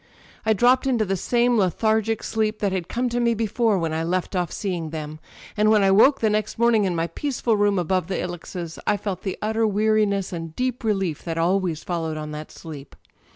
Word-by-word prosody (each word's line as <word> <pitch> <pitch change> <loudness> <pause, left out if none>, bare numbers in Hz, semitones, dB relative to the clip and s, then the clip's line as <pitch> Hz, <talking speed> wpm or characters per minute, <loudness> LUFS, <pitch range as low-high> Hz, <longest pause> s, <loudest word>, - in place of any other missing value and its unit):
I 220 - +5
dropped 250 +5 +3
into 240 -5 +2
the 195 0 0
same 240 +5 +2
lethargic 220 +3 +1
sleep 215 -1 -1
that 200 -2 0
had 185 -3 -2
come 250 +1 -1
to 240 +1 -1
me 235 -1 +2
before 225 0 +1
when 165 -3 -1
I 160 +1 -1
left 180 +3 -2
off 175 -2 -1
seeing 175 -5 -3
them; 155 -1 -6 0.4
and 215 0 +3
when 215 -2 +4
I 195 - +4
woke 260 +8 +5
the 220 - +3
next 215 0 -1
morning, 230 -3 +3
in 180 -2 -1
my 165 0 0
peaceful 245 +2 -1
room 205 -1 +2
above 180 0 0
the 190 - -2
ilexes, 175 -1 -6
I 205 - +3
felt 195 -3 -4
the 190 - -4
utter 220 +1 +1
weariness 210 -2 +1
and 165 -2 -6
deep 255 -1 -2
relief 195 -8 -1
that 165 -1 -3
always 170 -2 0
followed. 165 -3 -3
on 150 0 -5
that 150 0 -7
sleep. 145 -4 -10
195 Hz, 210 wpm, -23 LUFS, 170-220 Hz, 0.4 s, I